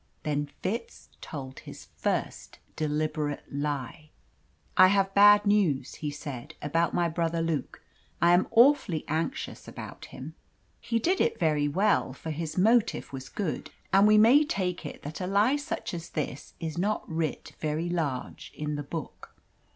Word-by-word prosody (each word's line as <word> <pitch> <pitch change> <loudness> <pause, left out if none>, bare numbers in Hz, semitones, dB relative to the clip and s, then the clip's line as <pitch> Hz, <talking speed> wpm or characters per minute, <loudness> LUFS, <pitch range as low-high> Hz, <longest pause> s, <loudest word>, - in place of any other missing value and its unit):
Then 145 -1 -1
Fitz 230 +5 -4
told 135 -4 -7
his - - -11
first - - -3 0.2
deliberate 150 -1 -1
lie. 145 +1 -4 0.7
"I 185 - +8
have 195 0 +3
had - - -29
bad 205 +1 +7
news," 180 -11 +2
he 150 - -4
said, 140 -4 -7
"about 165 +3 0
my 175 -1 +2
brother 165 0 -1
Luke. 165 -4 -2 0.4
I 170 +1 +5
am 180 +1 +4
awfully 230 - +4
anxious 160 - -3
about - - -9
him." - - -9 0.5
He 230 -1 -1
did 360 - +1
it - - +1
very 150 -3 +2
well; 190 -3 +2
for 160 +4 -6
his 160 +2 -4
motive 220 -4 +2
was 135 0 -7
good. 190 -7 -3 0.2
And 195 +2 +6
we 215 0 +6
may 240 +8 +7
take 180 - -2
it - - -10
that 150 +1 -6
such 180 - -3
a - - -4
lie 210 +6 +4 0.4
as 170 0 -6
this 145 -2 -5
is 160 0 -4
not 210 +4 0
writ 160 -1 -3
very 155 +2 -1
large 155 -7 -3
in 150 0 -3
the - - -3
Book. 150 +1 -7
165 Hz, 160 wpm, -28 LUFS, 150-200 Hz, 0.7 s, I